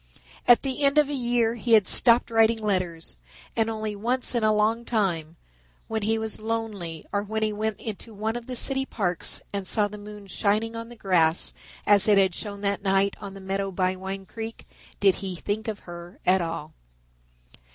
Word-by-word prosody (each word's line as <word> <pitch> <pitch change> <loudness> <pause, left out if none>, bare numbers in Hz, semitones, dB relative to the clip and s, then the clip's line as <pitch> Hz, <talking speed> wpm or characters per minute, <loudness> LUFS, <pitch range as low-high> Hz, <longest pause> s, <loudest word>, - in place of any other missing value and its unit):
At 240 - +6
the 270 0 -3
end 280 +1 +4
of 295 -2 +5
a - - -2
year 240 -3 +1
he 235 0 -1
had 215 -4 +6
stopped 235 0 +4
writing 225 0 +4
letters, 185 - -2 0.4
and 225 -1 +1
only 215 -1 -3
once 245 +6 +1
in 235 -2 0
a 215 - +4
long 215 +2 +1
time, 175 -9 -1 0.5
when 220 -1 -2
he 220 +2 +1
was 220 -1 -3
lonely 215 -8 -4
or 200 - 0
when 220 +1 -3
he 215 -1 0
went 215 0 -3
into 220 +1 -7
one 220 +2 -3
of 240 -1 -6
the 255 - -5
city 270 +2 +4
parks 185 -9 -2
and 200 -2 -3
saw 210 +2 +3
the 210 0 -10
moon 210 0 -10
shining 215 +3 0
on 230 0 -6
the 240 - -11
grass 180 -6 +3 0.3
as 205 0 +6
it 210 -1 +5
had 190 -2 +3
shone 200 +1 -6
that 200 -1 -1
night 195 0 +2
on 200 -1 -8
the - - -9
meadow 195 +1 -2
by 185 0 0
Wine 190 +1 -6
Creek, 225 +3 -8 0.3
did 195 -2 +5
he 190 -2 -4
think 205 +5 -3
of 215 -3 -4
her 175 0 -11
at 185 +1 +4
all. 165 -2 -5
210 Hz, 200 wpm, -25 LUFS, 195-225 Hz, 0.5 s, At